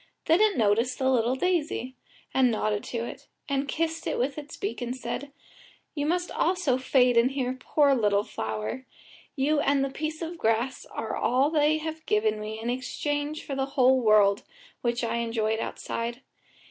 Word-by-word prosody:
Then 330 Hz, +5 st, +4 dB
it 430 Hz, -3 st, +3 dB
noticed 230 Hz, +3 st, +2 dB
the 260 Hz, 0 st, +2 dB
little 245 Hz, 0 st, +2 dB
daisy, 295 Hz, -5 st, -1 dB, 0.4 s
and 260 Hz, -1 st, +4 dB
nodded 215 Hz, -2 st, -1 dB
to 235 Hz, -1 st, -3 dB
it, -, -, -9 dB, 0.2 s
and 275 Hz, 0 st, -1 dB
kissed 325 Hz, +3 st, -2 dB
it -, -, -1 dB
with 270 Hz, +3 st, 0 dB
its 290 Hz, 0 st, -10 dB
beak 405 Hz, -8 st, -4 dB
and 245 Hz, +1 st, -3 dB
said: 280 Hz, +2 st, -5 dB, 0.6 s
"You 290 Hz, -1 st, -2 dB
must 355 Hz, +2 st, 0 dB
also 340 Hz, -7 st, +1 dB
fade 250 Hz, -2 st, +3 dB
in 235 Hz, +2 st, +5 dB
here, 260 Hz, -2 st, -2 dB
poor 280 Hz, +2 st, +2 dB
little 205 Hz, -5 st, +2 dB
flower. 110 Hz, -, -4 dB, 0.5 s
You 295 Hz, +2 st, +2 dB
and 280 Hz, -1 st, +2 dB
the 275 Hz, -, -4 dB
piece 310 Hz, +3 st, -4 dB
of 330 Hz, +1 st, -6 dB
grass 235 Hz, +3 st, 0 dB
are 225 Hz, -, -4 dB
all 265 Hz, +5 st, +2 dB
they 305 Hz, 0 st, +3 dB
have 315 Hz, 0 st, -5 dB
given 215 Hz, 0 st, +2 dB
me 215 Hz, +1 st, -5 dB
in 225 Hz, -, -5 dB
exchange 290 Hz, +4 st, -3 dB
for 280 Hz, -, -5 dB
the 270 Hz, 0 st, -1 dB
whole 260 Hz, 0 st, +5 dB
world, 210 Hz, -3 st, +5 dB, 0.4 s
which 240 Hz, 0 st, -1 dB
I 230 Hz, 0 st, 0 dB
enjoyed 225 Hz, -1 st, 0 dB
outside. 235 Hz, +3 st, -4 dB
260 Hz, 175 wpm, -27 LUFS, 230-295 Hz, 0.6 s, in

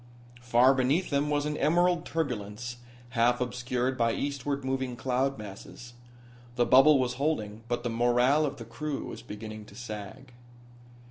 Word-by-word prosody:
Far 120 Hz, +2 st, +5 dB
beneath 135 Hz, +8 st, +1 dB
them 145 Hz, +1 st, +1 dB
was 145 Hz, 0 st, +1 dB
an 150 Hz, 0 st, -2 dB
emerald 175 Hz, +2 st, +2 dB
turbulence, 120 Hz, -6 st, -3 dB, 0.3 s
half 120 Hz, +1 st, +2 dB
obscured 125 Hz, +1 st, -2 dB
by 115 Hz, -1 st, +2 dB
eastward 140 Hz, -1 st, -3 dB
moving 130 Hz, -1 st, -2 dB
cloud 130 Hz, +2 st, 0 dB
masses. 105 Hz, +3 st, -10 dB, 0.6 s
The 120 Hz, -, +3 dB
bubble 135 Hz, +4 st, +7 dB
was 125 Hz, -1 st, 0 dB
holding, 110 Hz, -8 st, -1 dB
but 120 Hz, 0 st, -2 dB
the 120 Hz, -, -1 dB
morale 120 Hz, +6 st, +3 dB
of 140 Hz, 0 st, -6 dB
the 115 Hz, -, -8 dB
crew 145 Hz, +5 st, -4 dB
was 115 Hz, -, -7 dB
beginning 110 Hz, -1 st, -8 dB
to -, -, -15 dB
sag. 120 Hz, +3 st, -8 dB
125 Hz, 150 wpm, -29 LUFS, 120-140 Hz, 0.6 s, bubble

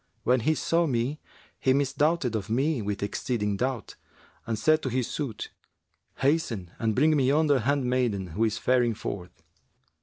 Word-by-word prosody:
When 125 Hz, +1 st, +3 dB
he 155 Hz, +7 st, +1 dB
saw 170 Hz, +1 st, +1 dB
me, 130 Hz, +3 st, -1 dB, 0.4 s
he 130 Hz, -, +3 dB
misdoubted 140 Hz, -1 st, +1 dB
of 105 Hz, -1 st, -3 dB
me 135 Hz, +3 st, +1 dB
with 100 Hz, -1 st, -3 dB
exceeding 105 Hz, 0 st, -1 dB
doubt, 125 Hz, +1 st, -3 dB, 0.5 s
and 115 Hz, -1 st, -1 dB
said 155 Hz, +8 st, +3 dB
to 130 Hz, -, -2 dB
his 125 Hz, 0 st, 0 dB
suite, 135 Hz, -8 st, -4 dB, 0.6 s
'Hasten 130 Hz, -, 0 dB
and 110 Hz, -2 st, 0 dB
bring 155 Hz, +3 st, +4 dB
me 135 Hz, -3 st, +2 dB
yonder 145 Hz, 0 st, +3 dB
handmaiden 125 Hz, -6 st, 0 dB
who 110 Hz, -, 0 dB
is 110 Hz, -2 st, +1 dB
faring 120 Hz, -3 st, +2 dB
forth.' 90 Hz, -4 st, -7 dB
125 Hz, 155 wpm, -27 LUFS, 110-145 Hz, 0.6 s, bring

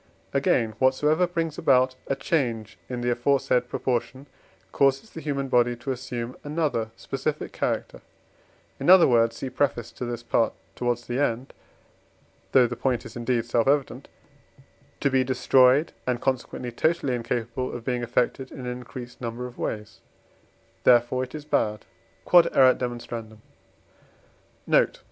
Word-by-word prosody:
Again, 115 Hz, -2 st, +2 dB
whatsoever 150 Hz, +6 st, +3 dB
brings 165 Hz, -3 st, -3 dB
about 130 Hz, -1 st, +3 dB
a 135 Hz, -, 0 dB
change 120 Hz, -8 st, -2 dB
in 125 Hz, -1 st, -4 dB
the 120 Hz, 0 st, 0 dB
aforesaid 125 Hz, 0 st, +1 dB
proportion 130 Hz, +2 st, -2 dB, 0.5 s
causes 135 Hz, +9 st, +1 dB
the 160 Hz, -, -8 dB
human 140 Hz, -3 st, -2 dB
body 120 Hz, -1 st, +2 dB
to 120 Hz, +3 st, -5 dB
assume 125 Hz, -1 st, -5 dB
another 145 Hz, -7 st, -1 dB
specific 140 Hz, +5 st, -4 dB
character, -, -, -3 dB, 0.8 s
in -, -, 0 dB
other 185 Hz, -1 st, +8 dB
words 115 Hz, -2 st, +3 dB
(see 135 Hz, -, -5 dB
Preface 120 Hz, -5 st, -1 dB
to -, -, -8 dB
this 120 Hz, -1 st, -5 dB
Part 115 Hz, -1 st, +1 dB, 0.2 s
towards 120 Hz, -1 st, -2 dB
the 120 Hz, +2 st, -2 dB
end, 130 Hz, -2 st, -1 dB, 1.0 s
though 130 Hz, -2 st, +6 dB
the 120 Hz, +1 st, -3 dB
point 125 Hz, 0 st, -1 dB
is -, -, -10 dB
indeed 120 Hz, -1 st, -1 dB
self 115 Hz, 0 st, +1 dB
evident), 140 Hz, -1 st, 0 dB, 0.9 s
to 140 Hz, -, +2 dB
be 130 Hz, 0 st, +3 dB
destroyed, 130 Hz, +3 st, +4 dB, 0.2 s
and 125 Hz, -1 st, 0 dB
consequently 125 Hz, -1 st, -2 dB
totally 155 Hz, +1 st, 0 dB
incapable 120 Hz, +1 st, -3 dB
of 120 Hz, -1 st, -7 dB
being 125 Hz, -1 st, -1 dB
affected 125 Hz, +2 st, -1 dB
in -, -, -8 dB
an -, -, -7 dB
increased 125 Hz, 0 st, -9 dB
numbers 120 Hz, +1 st, -4 dB
of 120 Hz, -, -17 dB
ways; 105 Hz, -1 st, -4 dB, 0.8 s
therefore 120 Hz, +1 st, +4 dB
it 130 Hz, -, -12 dB
is 150 Hz, -1 st, -7 dB
bad. 105 Hz, -7 st, 0 dB, 0.4 s
Q.E.D. 175 Hz, -1 st, +6 dB, 2.2 s
Note. -, -, +2 dB
125 Hz, 140 wpm, -25 LUFS, 120-135 Hz, 2.2 s, other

